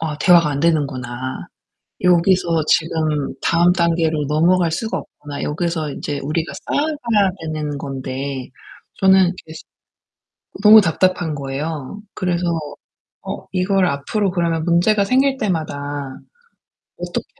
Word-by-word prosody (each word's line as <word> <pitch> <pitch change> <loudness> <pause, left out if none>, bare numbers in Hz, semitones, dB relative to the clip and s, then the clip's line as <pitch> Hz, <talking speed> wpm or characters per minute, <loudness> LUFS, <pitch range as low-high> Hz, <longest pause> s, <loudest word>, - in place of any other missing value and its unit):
'아, 155 -2 -3
대화가 170 -2 +5
안 140 -1 -2
되는구나. 130 -6 -2 0.6
여기서 175 -2 +3
지금 155 -3 0
다음 170 +2 +3
단계로 165 -3 +1
넘어갈 170 +3 +2
수가 220 +7 -2
없구나.' 145 -1 -9
여기서 160 -1 -2
인제 145 +1 -4
우리가 160 +3 -2
쌓아가야 240 -10 +1
되는 155 -2 -4
건데 135 -1 -5 0.5
저는 190 -2 +4
되게 160 - -11
시 - - -10 1.0
너무 215 +1 +9
답답한 180 -3 0
거예요. 145 +5 -5
그래서 180 -2 -1 0.8
어 - - -7
이걸 190 +1 +1
'앞으로 180 +8 -1 0.3
문제가 180 +5 +3
생길 265 +4 +2
때마다 145 - -3 0.8
어떻게 - - -4
165 Hz, 260 characters per minute, -19 LUFS, 145-185 Hz, 1.0 s, 너무